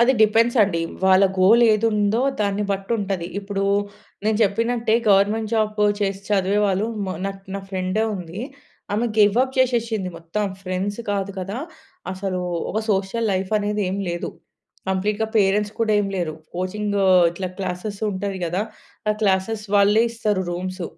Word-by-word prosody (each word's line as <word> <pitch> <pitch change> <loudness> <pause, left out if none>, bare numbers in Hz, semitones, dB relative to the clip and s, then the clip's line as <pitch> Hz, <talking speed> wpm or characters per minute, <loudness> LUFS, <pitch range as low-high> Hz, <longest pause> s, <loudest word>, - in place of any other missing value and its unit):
అది 240 +2 +5
డిపెండ్స్ 230 +3 +3
అండి. 190 -5 0 0.2
వాళ్ళ 190 +1 +6 0.2
గోల్ 220 +6 +6
ఏదుందో 215 0 +2 0.2
దాన్ని 205 0 0
బట్టి 195 +1 -3
ఉంటది. 195 -4 -2
ఇప్పుడు 195 0 -3 0.6
నేను 215 0 +2
చెప్పినట్టే 225 +2 +1 0.2
గవర్నమెంట్ 210 +3 +3
జాబ్ 215 -1 0 0.2
చేసి 195 -1 -1
చదివేవాళ్ళు 200 +1 +2 0.2
మా 185 - -2
నాక్ 195 0 -5
నా 200 - -3
ఫ్రెండే 185 +3 0
ఉంది. 180 +2 -7 0.5
ఆమె 225 +3 +1
గివ్ 205 0 +5
అప్ 260 0 -3
చేసేసింది. 230 -6 +1
మొత్తం 170 +6 -3 0.2
ఫ్రెండ్స్ 190 +2 -3
కాదు 200 -1 -1
కదా! 195 +3 -4 0.6
అసలు 190 -1 -3 0.3
ఒక 220 - 0
సోషల్ 200 +3 0
లైఫ్ 185 0 -2
అనేది 210 0 -1
ఏమి 200 +1 -2
లేదు. 175 0 -3 0.6
కంప్లీట్‌గా 205 +3 0
పేరెంట్స్ 205 +1 +2
కూడా 220 -1 +2
ఏమి 200 -1 -2
లేరు. 170 -4 -2 0.2
కోచింగ్ 205 +3 -2 0.3
ఇట్లా 185 +2 -4
క్లాసెస్ 190 +2 -4
ఉంటది 195 0 -3
కదా! 175 +3 -1 0.5
ఆ - - +4
క్లాసెస్ 205 +2 +1
వాళ్ళే 205 +2 +5
ఇస్తారు. 210 -4 -1
రూమ్స్ 185 +1 -4
200 Hz, 145 wpm, -22 LUFS, 190-215 Hz, 0.6 s, వాళ్ళ